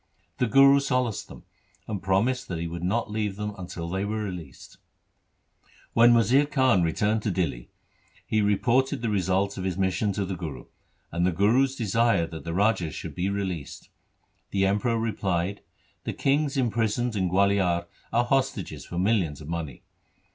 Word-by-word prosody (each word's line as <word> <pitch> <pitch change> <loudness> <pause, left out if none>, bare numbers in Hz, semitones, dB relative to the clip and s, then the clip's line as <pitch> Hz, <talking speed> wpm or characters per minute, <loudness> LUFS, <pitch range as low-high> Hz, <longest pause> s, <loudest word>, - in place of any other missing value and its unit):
The 125 - +2
Guru 135 +3 +6
solaced 125 -5 -1
them, - - -12 0.4
and 105 -4 -4
promised 100 +7 +1
that 90 - -4
he 85 +1 -3
would 85 +1 -6
not 105 +4 -1
leave 105 -2 -2
them 105 +1 -4
until 90 -3 -6
they 95 +3 -2
were 110 +1 -2
released. 90 -8 -8 1.1
When 120 +1 +6
Wazir 125 +6 +4
Khan 130 -9 +3
returned 105 +6 +1
to 105 - -1
Dihli, 75 -10 -2 0.6
he 110 - +1
reported 120 +5 +1
the 115 - 0
result 95 0 0
of - - -4
his 95 -2 -2
mission 95 +2 +1
to 100 0 -2
the 95 0 -4
Guru, 75 -8 -7 0.5
and 85 +1 -1
the 90 - +3
Guru's 120 +9 +2
desire 115 -5 +2
that 80 -1 -8
the 85 - -3
rajas 95 -5 +1
should - - -6
be 90 +2 -1
released. 95 -7 -4 0.6
The 95 0 +1
Emperor 105 +4 +1
replied, 100 -4 -1 0.2
' - - -39
The - - -2
kings 140 +1 +1
imprisoned 120 -1 0
in 95 -3 0
Gualiar 95 -2 +2 0.3
are 120 +1 +2
hostages 135 +1 -1
for 85 - -6
millions 90 -6 +1
of 75 - -10
money. 80 -6 -5
100 Hz, 170 wpm, -26 LUFS, 90-115 Hz, 1.1 s, Guru